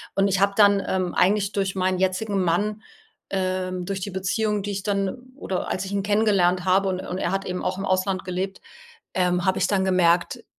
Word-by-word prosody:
und 195 0 +3
ich 190 0 +1
habe 200 0 +3
dann, 200 -1 +5
ähm, 185 -2 -1
eigentlich 200 +2 +2
durch 195 -2 -1
meinen 185 0 0
jetzigen 190 +1 0
Mann, 205 +5 0 0.5
ähm 185 -1 -2
durch 195 0 -4
die 200 - -4
Beziehung, 205 +3 -1
die 205 - -3
ich 195 0 -4
dann 205 +5 -2
oder 190 -8 -3
als 190 +1 -2
ich 195 - -6
ihn 200 -1 0
kennengelernt 200 -4 +2
habe 190 +1 +3
und 185 0 -2
und 180 - -5
er - - -1
hat 195 0 -2
eben 180 0 -4
auch 185 - -1
im 195 - -3
Ausland 185 0 0
gelebt, 185 +2 -3 0.6
ähm, 180 -1 +1
habe 190 - +2
ich 185 - +2
dann 190 -2 +1
gemerkt, 175 -2 +2
190 Hz, 210 wpm, -24 LUFS, 185-200 Hz, 0.6 s, dann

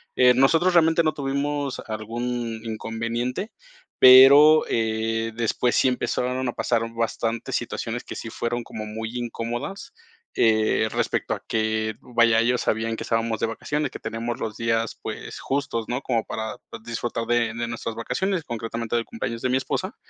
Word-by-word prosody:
Eh, 125 0 +6
nosotros 165 +8 +3
realmente 165 -1 +4
no 155 -1 +1
tuvimos 140 0 -2
algún 115 +1 -4
inconveniente, 115 - -3 0.5
pero, 140 +4 +9
eh, 115 0 -1
después 120 +1 0
sí 130 - +4
empezaron 125 0 -1
a 120 - -2
pasar 120 -2 0
bastantes 115 0 -2
situaciones 115 +2 -4
que - - -7
sí 115 - -6
fueron 120 +2 -3
como 110 -1 -7
muy 110 +1 -5
incómodas. 120 - -5 0.5
Eh, 110 -1 +3
respecto - - -1
a - - -6
que, 110 -1 0
vaya, 115 -2 +3
ellos 120 +2 +2
sabían 115 +1 -1
que - - -8
estábamos 115 -1 -1
de - - +1
vacaciones, 145 +6 -2
que - - -7
tenemos 115 +2 -4
los 110 -2 -4
días, 115 0 -1
pues - - -6
justos, 135 -5 -2
¿no?, 125 +2 -2
como 115 -3 0
para 110 -1 -5 0.3
disfrutar 115 0 -3
de 120 -1 +1
de 115 0 -2
nuestras 115 -1 -5
vacaciones, 185 - -1
concretamente 115 -2 -4
del 115 -1 0
cumpleaños 115 - -5
de 130 - 0
mi 130 - +3
esposa. 130 - -3
115 Hz, 160 wpm, -24 LUFS, 115-130 Hz, 0.5 s, pero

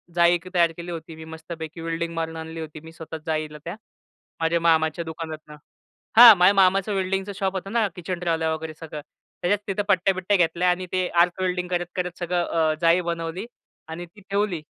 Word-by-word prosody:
जाळी 170 0 +5
1 175 +1 -3
तयार 170 -2 +4
केली 175 +1 -6
होती, 165 -1 -7
मी 160 - -10
मस्तपैकी 160 0 -8
वेल्डिंग 165 0 -3
मारून 165 -1 -3
आणली 160 0 -7
होती, 155 -1 -7
मी 160 - -11
स्वतः 160 0 -8
जाळीला 155 -1 -2
त्या. 170 - -5 0.6
माझ्या 165 +1 +1
मामाच्या 160 0 +2
दुकानातनं. 160 -2 -7 0.6
हां. 235 -2 +12
माझ्या 180 +3 +6
मामाचं 195 +1 +3
वेल्डिंगचं 195 +1 -1
शॉप 195 0 -1
होतं 195 +1 -5
ना 225 -2 +2
किचन 180 0 -4
ट्रॉल्या 165 -2 0
वगैरे 160 0 -5
सगळं 155 -2 -7 0.4
त्याच्यात 200 +3 +1
तिथं 200 +1 -1
पट्ट्या-बिट्ट्या 185 +1 +2
घेतल्या 175 +1 +2
आणि 180 +1 0
ते 185 -1 0
आर्क 180 +1 +1
वेल्डिंग 180 -1 -1
करत-करत 180 0 -3
सगळं 175 0 0
अ, 160 -1 +1
जाळी 170 +2 +4
बनवली 170 +3 -4 0.4
आणि 165 +2 -6
ती 180 +5 -19
ठेवली. 200 -4 0
170 Hz, 185 wpm, -24 LUFS, 160-185 Hz, 0.6 s, हां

